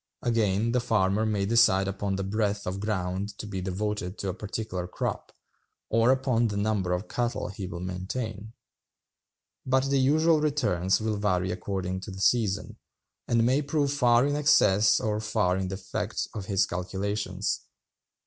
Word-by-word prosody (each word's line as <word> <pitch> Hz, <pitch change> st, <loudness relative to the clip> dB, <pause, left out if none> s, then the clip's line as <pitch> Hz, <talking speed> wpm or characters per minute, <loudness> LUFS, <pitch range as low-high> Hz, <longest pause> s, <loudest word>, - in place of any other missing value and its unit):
Again, 115 Hz, -1 st, +1 dB
the 125 Hz, -, +2 dB
farmer 110 Hz, -2 st, +1 dB
may 105 Hz, -2 st, 0 dB
decide 100 Hz, -3 st, +4 dB
upon 100 Hz, 0 st, -2 dB
the 95 Hz, -, -2 dB
breadth 105 Hz, +1 st, -1 dB
of 95 Hz, +2 st, -3 dB
ground 100 Hz, 0 st, -2 dB
to -, -, -6 dB
be 95 Hz, -2 st, -4 dB
devoted 95 Hz, 0 st, -3 dB
to 100 Hz, -, -3 dB
a -, -, -2 dB
particular 95 Hz, -2 st, -4 dB
crop, -, -, -4 dB, 0.6 s
or 115 Hz, +2 st, +4 dB
upon 130 Hz, -3 st, +2 dB
the 105 Hz, -2 st, -3 dB
number 100 Hz, -3 st, 0 dB
of 90 Hz, +3 st, -1 dB
cattle 120 Hz, -3 st, -2 dB
he 100 Hz, -1 st, -6 dB
will 90 Hz, -2 st, -6 dB
maintain; 105 Hz, +4 st, -5 dB, 1.1 s
but 130 Hz, +1 st, +1 dB
the 135 Hz, +1 st, +3 dB
actual 160 Hz, -1 st, +3 dB
returns 105 Hz, -, +1 dB
will 110 Hz, -1 st, -1 dB
vary 95 Hz, -3 st, 0 dB
according 95 Hz, 0 st, -3 dB
to 95 Hz, -, -8 dB
the 95 Hz, 0 st, -8 dB
season, 105 Hz, 0 st, +1 dB, 0.5 s
and 115 Hz, -1 st, +3 dB
may 130 Hz, +4 st, +3 dB
prove 145 Hz, -1 st, 0 dB
far 120 Hz, -2 st, +4 dB
in 145 Hz, 0 st, 0 dB
excess 105 Hz, -8 st, +4 dB
or 105 Hz, -1 st, -1 dB
far 105 Hz, -4 st, +1 dB
in 95 Hz, 0 st, -2 dB
defect 95 Hz, 0 st, -3 dB
of 105 Hz, -4 st, -5 dB
his 100 Hz, -1 st, +2 dB
calculations. 95 Hz, +1 st, -3 dB
105 Hz, 160 wpm, -27 LUFS, 95-115 Hz, 1.1 s, decide